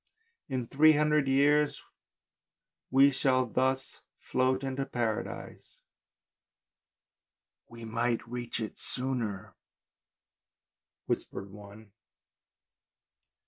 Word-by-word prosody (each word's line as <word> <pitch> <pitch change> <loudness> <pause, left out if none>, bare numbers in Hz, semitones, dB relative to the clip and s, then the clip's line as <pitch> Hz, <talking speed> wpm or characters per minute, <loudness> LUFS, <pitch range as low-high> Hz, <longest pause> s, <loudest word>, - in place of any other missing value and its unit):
" 465 - -47
In 130 -3 -2
three 155 +6 +5
hundred 150 -1 +2
years 145 +2 +3 1.1
we 135 +2 +6
shall 130 -1 +2
thus 130 +3 -1 0.2
float 130 +1 0
into 135 0 -2
Paradise." 115 -5 -4 0.9
" - - -55
We 115 -1 -10
might 115 +1 -1
reach 120 0 -4
it 110 -2 -5
sooner," 125 -7 -3 1.5
whispered 100 0 -4
one. 105 +1 -13
130 Hz, 85 wpm, -30 LUFS, 115-135 Hz, 1.5 s, we